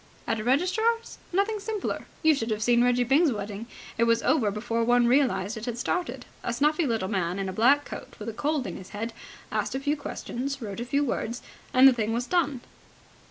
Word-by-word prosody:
"At 225 -1 -1
a - - -3
registrar's? 370 - +1
Nothing 400 +4 +1
simpler. 420 -1 -3 0.2
You 315 0 +6
should 235 -5 -2
have 215 0 -1
seen 240 +1 +4
Reggie 245 0 +3
Byng's 280 +5 +4
wedding. 205 0 -5 0.3
It 235 - +5
was 230 0 +2
over 245 -10 +3
before 230 +3 -1
one 245 +1 +4
realized 235 -6 +2
it 220 - -6
had 240 -2 -3
started. 360 +8 -2 0.2
A 240 - -1
snuffy 300 +5 +2
little 225 -5 0
man 185 -3 -1
in 195 -1 -2
a 190 - -4
black 275 +8 +4
coat - - -8
with 210 - -8
a 225 - -3
cold 290 +2 -1
in - - -5
his 185 - -11
head 225 +2 -3 0.4
asked - - -1
a - - 0
few 290 +2 0
questions, 275 -1 -4
wrote 210 -4 -6
a 240 - -3
few 280 +3 +1
words, 240 -2 -3 0.3
and 255 +1 +8
the 265 - +7
thing 225 -2 -1
was 240 +1 -1
done." 295 -6 0
245 Hz, 215 wpm, -27 LUFS, 225-290 Hz, 0.4 s, and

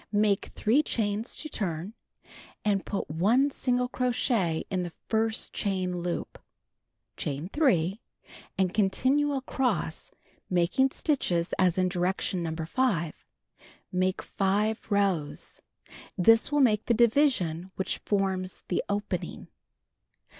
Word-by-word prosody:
Make 205 -1 +2
3 240 +8 +3
chains 220 -5 -1
to 310 - -6
turn, 185 - -3 0.7
and 200 -2 +1
put 200 - -2
1 220 - +2
single 250 -2 0
crochet 235 -9 0
in 185 -1 0
the 175 - -3
first 220 +5 -1
chain 185 -3 -1
loop. 175 0 -4 0.8
Chain 150 +5 -3
3, 200 - +2 0.6
and 185 -1 +1
continue 260 +9 +2
across, 255 - -1 0.4
making 180 +9 +2
stitches 190 - 0
as 185 -2 +3
in 185 0 +3
direction 180 0 -1
No. 160 -1 -3
5. 170 0 0 0.8
Make 185 0 0
5 210 +4 0
rows. 195 -8 -1 0.6
This 225 +8 +5
will 290 0 +3
make 215 -5 +3
the 235 - +2
division 220 - +2
which 190 - -2
forms 190 -2 -1
the 180 - 0
opening. 205 +1 -3
200 Hz, 115 wpm, -28 LUFS, 180-235 Hz, 0.8 s, This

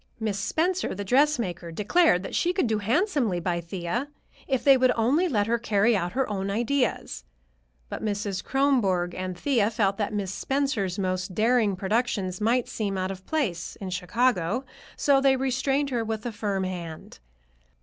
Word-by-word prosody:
Miss 215 -3 -2
Spencer, 345 - 0
the 205 - -4
dressmaker, 230 - +1
declared 210 - +3
that - - -7
she 355 - +1
could 370 - +1
do 220 -2 0
handsomely 240 - +1
by 170 0 -1
Thea 180 - -3 0.4
if 265 -3 0
they 275 -1 +7
would 255 -1 +4
only 270 +11 +2
let 210 -10 +1
her 235 +2 0
carry 225 0 +2
out 175 -2 -2
her 265 +1 0
own 195 -2 -3
ideas. 235 - -1 0.6
But - - -6
Mrs. 205 -2 -2
Kronborg 210 -11 +1
and 185 -1 -5
Thea 230 -2 +2
felt 200 -3 0
that 205 -2 -1
Miss 200 -3 -3
Spencer's 265 -9 -1
most 185 -1 -2
daring 220 -2 +3
productions 195 -1 -1
might 235 +3 +2
seem 200 -3 -3
out 185 0 -1
of 190 0 -10
place 235 - -2
in 190 -2 -6
Chicago, 200 +4 0 0.3
so 275 -2 +3
they 270 -1 +4
restrained 270 +2 0
her 235 -2 0
with 220 0 -4
a 240 - -2
firm 205 -3 -2
hand. 170 - -6
215 Hz, 170 wpm, -26 LUFS, 190-260 Hz, 0.6 s, they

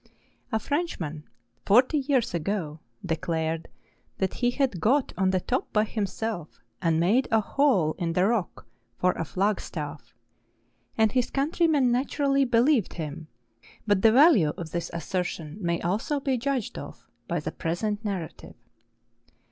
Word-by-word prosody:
A 220 - +2
French¬ 305 +9 -2
man, 155 -2 -5 0.4
forty 255 +8 +4
years 260 -6 0
ago, 165 -2 -2 0.3
declared 165 -1 -2 0.5
that 190 -1 -1
he 245 - +1
had 245 - -1
got 260 - +2
on 190 +1 +2
the 185 0 +2
top 250 +8 -2
by 215 - +3
himself, 210 -4 -4 0.2
and 165 -2 +2
made 215 +10 +3
a 225 - +4
hole 210 - +2
in 170 -2 -1
the 180 +2 +3
rock 215 -4 -1 0.3
for 180 - +3
a 165 - -3
flag 195 +6 0
staff; - - -7 0.8
and 220 -1 +4
his 250 -1 +1
countrymen 290 -2 +2
naturally 275 +2 +1
believed 240 - +3
him; 160 -1 -6 0.6
but 205 -3 +2
the 225 - +6
value 240 - +6
of 165 -2 -6
this 170 -1 -3
assertion 170 0 -4
may 170 -2 0
also 210 - -1
be 270 -1 0
judged 255 -2 -2
of 145 - -10 0.2
by 170 - -1
the 150 - -4
present 205 +6 -2
narrative. 190 -6 -5
205 Hz, 150 wpm, -26 LUFS, 170-255 Hz, 0.8 s, the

